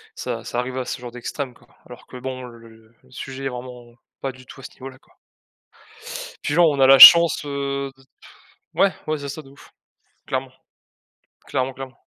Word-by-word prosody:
ça - - -5
ça 120 - -4
arrive 125 +1 -4
à 130 - -3
ce - - -5
genre 120 - -8
d'extrême 125 +2 -6
quoi, 120 +1 -24 0.2
alors 125 - -14
que 125 - -11
bon, 130 0 -7
le 115 -2 -15 0.2
sujet 135 +1 -8
est - - -1
vraiment 125 -1 -10 0.3
pas 135 - -3
du 130 0 -17
tout 135 - -14
à - - -17
ce - - -10
niveau-là 130 0 -11
quoi - - -30 1.3
puis 145 - -2
genre 170 -2 +5
on 140 - -2
a 135 - +6
la 135 0 +8
chance, 170 0 +9
heu, 140 -1 -4
de 135 - -22
pff, 130 - -27 0.7
ouais. 195 - +3 0.2
Ouais 155 0 -1
c'est 140 -1 -7
ça 155 - -7
de 135 - -17
ouf, 140 - -18 0.6
clairement, 130 0 -3 1.0
clairement, 130 +1 -2
clairement. 130 -1 -11
130 Hz, 200 wpm, -21 LUFS, 125-140 Hz, 1.3 s, chance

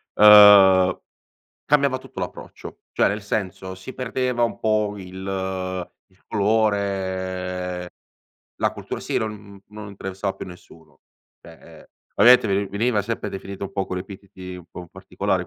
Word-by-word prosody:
ehm, 100 -3 +8 0.7
cambiava 140 -3 +2
tutto - - -11
l'approccio. - - -8
Cioè, - - +2
nel 105 +1 -3
senso, 95 -2 -4
si 95 +8 -10
perdeva 125 -1 -2
un 115 - -1
po' 105 -1 0
il 95 -1 -5 0.2
il 95 - -31
colore, 95 -4 -1 0.7
la - - +1
cultura - - -7
sì - - -3
non 105 -2 -5
non 105 0 -9
interessava 95 0 -5
più - - -7
nessuno 85 -3 -15 0.4
cioè, 80 -1 -15 0.2
ehm, - - -16 0.3
ovviamente 125 -2 +7
veni 100 0 0
veniva 105 +3 0
sempre 105 0 -4
definito 95 0 -7
un 95 - -8
po' 95 -1 -2
con 90 - -4
epiteti 95 -1 -9
un 90 -2 -11
po' 90 -1 -9
particolari - - -3
100 Hz, 140 wpm, -22 LUFS, 95-105 Hz, 0.7 s, ehm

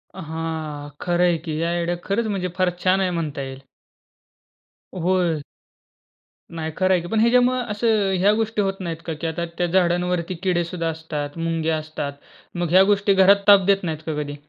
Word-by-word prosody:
हां. 160 -3 -5
खरंय 175 -1 +2
की, 155 -1 -3
ह्या 165 - 0
आयडिया 175 0 -1
खरंच 220 +3 0
म्हणजे 195 -3 -2
फार 185 -1 +3
छान 185 +1 +3
आहे 185 - +1
म्हणता 155 -5 -3
येईल. 135 0 -7 1.3
होय. 175 -3 +1 1.1
नाही 160 -1 -3
खरं 185 0 +2
आहे 180 - +2
की 175 - -7
पण 220 +4 0
ह्याच्यामुळं 250 +2 +3
असं 210 -2 +1
ह्या 200 +3 +5
गोष्टी 220 -1 0
होत 195 -1 0
नाहीत 170 -3 -4
का 165 - -3
की, 160 +2 -4
आता 170 +1 -3
त्या 175 - +1
झाडांवरती 180 0 +1
किडे 180 -2 +1
सुद्धा 170 -1 -4
असतात, 155 -2 -5
मुंग्या 165 -1 -1
असतात. 155 -2 -5 0.4
मग 175 -1 -1
ह्या 185 +2 +7
गोष्टी 200 0 +3
घरात 195 +1 +5
ताप 200 -2 +7
देत 195 -1 +3
नाहीत 160 -3 -3
का 155 -2 -3
कधी? 145 0 -5
175 Hz, 180 wpm, -22 LUFS, 160-195 Hz, 1.3 s, ह्या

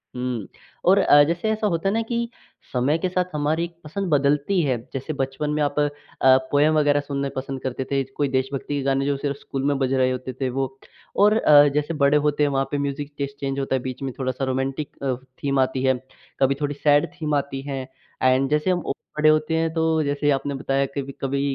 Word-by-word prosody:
उम, 125 -5 -3 0.4
और 190 +2 +6
अ, 145 -6 +7
जैसे 170 +8 -1
ऐसा 215 0 0
होता 170 -1 -1
है - - 0
ना 225 - +1
कि 235 0 -1 0.4
समय 130 +5 +2
के 180 +3 -1
साथ 180 0 0
हमारी 155 +3 0 0.2
पसंद 190 +5 -4
बदलती 145 +5 +2
है। 130 -4 +1 0.2
जैसे 135 +4 -4
बचपन 135 +2 -2
में 150 0 0
आप 145 0 0
अ, 145 0 +3 0.6
पोएम 150 +2 +4
वग़ैरह 145 -1 +3
सुनना 140 -1 -3
पसंद 135 0 -4
करते 130 0 -3
थे, 135 -1 +2
ज - - -14
कोई 145 - +2
देशभक्ति 135 +2 -2
के - - -1
गाने 135 0 +1
जो 140 0 +1
सिर्फ़ 140 0 -3
स्कूल 135 -1 -5
में 145 -1 +2
बज 135 -1 +1
रहे 130 -1 +3
होते 130 0 -4
थे 130 - +1
वो। 135 +1 -1 0.5
और 210 +2 +5
अ, 145 -7 +7
जैसे 150 +3 0
बड़े 145 -1 +3
होते 150 0 +1
हैं 145 - +3
वहाँ 135 -1 0
पे 145 - 0
म्यूज़िक 140 +1 -3
टेस्ट 140 0 -4
चेंज 135 0 -2
होता 135 -1 0
है, 130 - -1
बीच 130 +1 -6
में 135 -1 -3
थोड़ा-सा 130 0 -1
रोमांटिक 135 +3 -2
अ, 130 -2 0 0.3
थीम 140 -1 +1
आती 130 0 +1
है, 130 0 +4 0.5
कभी 135 0 +3
थोड़ी 145 0 -1
सैड 145 0 +3
थीम 155 -4 -3
आती 140 -1 -2
हैं। 135 -2 -4 0.4
एंड 130 +1 +3
जैसे 150 +4 +1
हम 180 -1 0
औ - - -1 0.2
बड़े 155 0 +5
होते 155 +1 +2
हैं 165 0 0
तो 160 -1 +1
जैसे 145 0 0
आपने 140 +1 -1
बताया 135 0 0
कभी-कभी 140 0 -3
140 Hz, 225 wpm, -23 LUFS, 135-150 Hz, 0.6 s, अ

